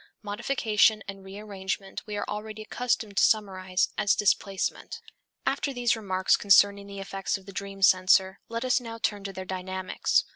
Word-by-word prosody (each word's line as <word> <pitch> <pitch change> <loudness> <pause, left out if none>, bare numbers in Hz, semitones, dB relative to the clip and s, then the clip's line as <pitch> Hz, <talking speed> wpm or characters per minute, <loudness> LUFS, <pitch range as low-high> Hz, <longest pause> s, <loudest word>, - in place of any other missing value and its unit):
Modification 215 0 +2
and 195 -1 -8
rearrangement 195 -1 -5
we 210 -1 -4
are - - -2
already 215 +1 -6
accustomed 220 -3 -2
to - - +5
summarize 190 -3 +1
as 205 - +3
displacement. 195 -1 -1 0.5
After 280 - 0
these 240 -1 +2
remarks 190 -4 +1
concerning 200 0 +4
the 200 0 -8
effects 195 0 -3
of 190 - -17
the 195 - -10
dream 195 0 -6
censor, 190 +1 +4
let 230 +2 -3
us 255 0 +2
now 230 -1 -7
turn 205 -3 -2
to 195 - -4
their 190 0 -6
dynamics. 185 0 -1
200 Hz, 160 wpm, -27 LUFS, 190-215 Hz, 0.5 s, to